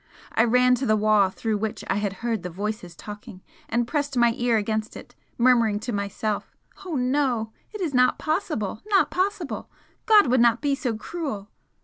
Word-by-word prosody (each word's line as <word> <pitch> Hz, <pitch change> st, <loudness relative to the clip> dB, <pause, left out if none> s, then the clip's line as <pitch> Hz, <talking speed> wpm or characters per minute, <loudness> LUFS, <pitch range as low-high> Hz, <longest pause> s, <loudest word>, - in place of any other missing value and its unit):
I 225 Hz, -, +3 dB
ran 250 Hz, +2 st, +4 dB
to 265 Hz, -, 0 dB
the 215 Hz, -, +4 dB
wall 210 Hz, -2 st, +4 dB
through 215 Hz, +2 st, -2 dB
which 220 Hz, 0 st, -3 dB
I -, -, 0 dB
had 205 Hz, -1 st, -1 dB
heard 230 Hz, -4 st, 0 dB
the 180 Hz, -, -5 dB
voices 190 Hz, -1 st, -5 dB
talking 205 Hz, -2 st, -10 dB, 0.3 s
and 235 Hz, +1 st, 0 dB
pressed 285 Hz, -1 st, -2 dB
my 235 Hz, -1 st, +4 dB
ear 240 Hz, -2 st, +2 dB
against 215 Hz, +1 st, -2 dB
it, -, -, -12 dB, 0.2 s
murmuring 235 Hz, -4 st, +3 dB
to 240 Hz, +1 st, -4 dB
myself 200 Hz, +1 st, -3 dB, 0.3 s
"Oh 360 Hz, -4 st, -4 dB
no! 250 Hz, -4 st, 0 dB, 0.2 s
it 425 Hz, -, -7 dB
is 325 Hz, -6 st, -1 dB
not 250 Hz, 0 st, +4 dB
possible! 305 Hz, -, -2 dB
not 395 Hz, -3 st, +3 dB
possible! 370 Hz, -4 st, -2 dB, 0.4 s
God 430 Hz, -2 st, +7 dB
would 250 Hz, -1 st, +3 dB
not 235 Hz, 0 st, +4 dB
be 285 Hz, -1 st, 0 dB
so 250 Hz, -5 st, -2 dB
cruel!" 220 Hz, -, -5 dB
235 Hz, 180 wpm, -25 LUFS, 215-275 Hz, 0.4 s, God